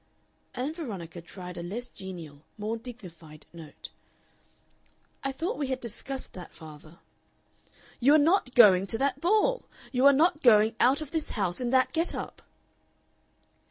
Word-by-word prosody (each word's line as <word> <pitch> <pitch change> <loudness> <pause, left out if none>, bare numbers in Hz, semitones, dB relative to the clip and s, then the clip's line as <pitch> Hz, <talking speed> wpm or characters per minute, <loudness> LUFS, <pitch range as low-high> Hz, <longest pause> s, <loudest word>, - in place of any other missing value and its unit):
Ann 265 +5 -3
Veronica 190 - -7
tried 180 0 -9
a - - -4
less 215 +8 -5
genial, 170 -9 -10 0.2
more 215 +2 -3
dignified 175 -11 -12
note. 160 -3 -11 1.3
"I 275 - -1
thought 335 - -4
we 285 - -1
had 260 -1 -2
discussed 255 +3 -5
that, 180 - -10
father." 155 0 -13 1.0
"You 275 +5 +5
are - - +8
not 310 -4 +2
going 195 -4 +7
to 225 - -1
that 275 +3 -1
ball! 435 +7 +2 0.3
You 260 +1 +4
are - - +9
not 305 +3 +2
going 220 -3 +5
out 265 +5 +4
of 305 - -7
this 320 -2 -2
house 190 0 -1
in 245 - -1
that 260 +1 +2
get 330 +1 0
up!" - - -7
240 Hz, 155 wpm, -28 LUFS, 180-280 Hz, 1.3 s, are